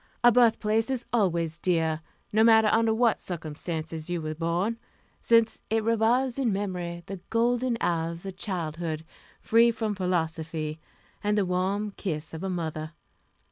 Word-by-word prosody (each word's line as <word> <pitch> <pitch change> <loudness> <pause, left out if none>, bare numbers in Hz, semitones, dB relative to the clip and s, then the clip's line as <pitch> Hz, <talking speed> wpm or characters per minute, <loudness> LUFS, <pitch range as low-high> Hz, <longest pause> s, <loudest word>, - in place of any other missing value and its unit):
A 240 - +8
birthplace 225 -1 +3
is 260 -2 -2
always 170 -7 +1
dear, 160 -3 +1 0.3
no 220 +1 +5
matter 220 -1 +6
under 225 0 +3
what 230 0 +2
circumstances 160 -1 -5
you 175 -1 -1
were 155 -1 -3
born, 175 +8 -1 0.4
since 230 -1 +3
it 225 0 +1
revives 235 +4 +2
in 250 -5 +2
memory 180 -3 -3
the 195 +1 -6
golden 240 +1 +1
hours 170 0 -1
of 190 -1 -6
childhood, 165 -4 -4 0.4
free 230 +1 +5
from 225 -2 -1
philosophy, 160 -4 -2 0.4
and 210 0 +1
the 200 - +2
warm 190 +3 -1
kiss 160 -5 -4
of 160 - -6
a 190 - -2
mother. 160 -3 -4
185 Hz, 145 wpm, -27 LUFS, 165-225 Hz, 0.4 s, A